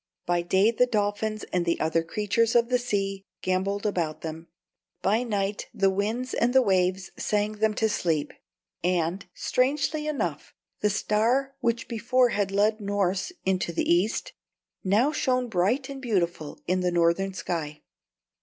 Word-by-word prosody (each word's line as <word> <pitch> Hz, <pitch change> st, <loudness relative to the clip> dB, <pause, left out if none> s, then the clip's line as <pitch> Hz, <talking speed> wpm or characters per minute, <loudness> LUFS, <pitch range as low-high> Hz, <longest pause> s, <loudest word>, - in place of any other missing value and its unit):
By 175 Hz, 0 st, +1 dB
day 190 Hz, +5 st, +3 dB
the 250 Hz, +2 st, +3 dB
dolphins 215 Hz, -1 st, -1 dB
and 180 Hz, -1 st, +2 dB
the 170 Hz, 0 st, 0 dB
other 160 Hz, +1 st, +1 dB
creatures 210 Hz, +7 st, 0 dB
of 235 Hz, 0 st, +4 dB
the 250 Hz, -1 st, +3 dB
sea 195 Hz, -4 st, -2 dB, 0.2 s
gambolled 195 Hz, +2 st, 0 dB
about 170 Hz, -7 st, -1 dB
them; 165 Hz, +1 st, -6 dB, 0.6 s
by 210 Hz, +5 st, +3 dB
night 205 Hz, -4 st, -2 dB
the 195 Hz, -1 st, +3 dB
winds 220 Hz, +6 st, -2 dB
and 245 Hz, +2 st, +1 dB
the 265 Hz, -, +8 dB
waves 185 Hz, -2 st, +1 dB
sang 210 Hz, 0 st, -1 dB
them 220 Hz, -1 st, +2 dB
to 220 Hz, -, +2 dB
sleep; 165 Hz, -8 st, -1 dB, 0.5 s
and, 180 Hz, +1 st, 0 dB
strangely 295 Hz, +4 st, 0 dB
enough, 300 Hz, -2 st, -3 dB, 0.2 s
the 210 Hz, -, +2 dB
Star 230 Hz, +6 st, +1 dB
which 235 Hz, -3 st, -1 dB
before 245 Hz, +2 st, +2 dB
had 205 Hz, -3 st, 0 dB
led 210 Hz, +3 st, +2 dB
Norss 200 Hz, -, -1 dB
into 185 Hz, -2 st, 0 dB
the 170 Hz, -, -1 dB
East, 180 Hz, +6 st, +1 dB, 0.5 s
now 215 Hz, +10 st, +3 dB
shone 255 Hz, -4 st, 0 dB
bright 225 Hz, +7 st, +1 dB
and 275 Hz, -1 st, -7 dB
beautiful 175 Hz, -, -1 dB
in 185 Hz, +1 st, +1 dB
the 180 Hz, 0 st, +1 dB
Northern 175 Hz, +3 st, +1 dB
sky! 165 Hz, -4 st, -4 dB
205 Hz, 155 wpm, -26 LUFS, 180-230 Hz, 0.6 s, the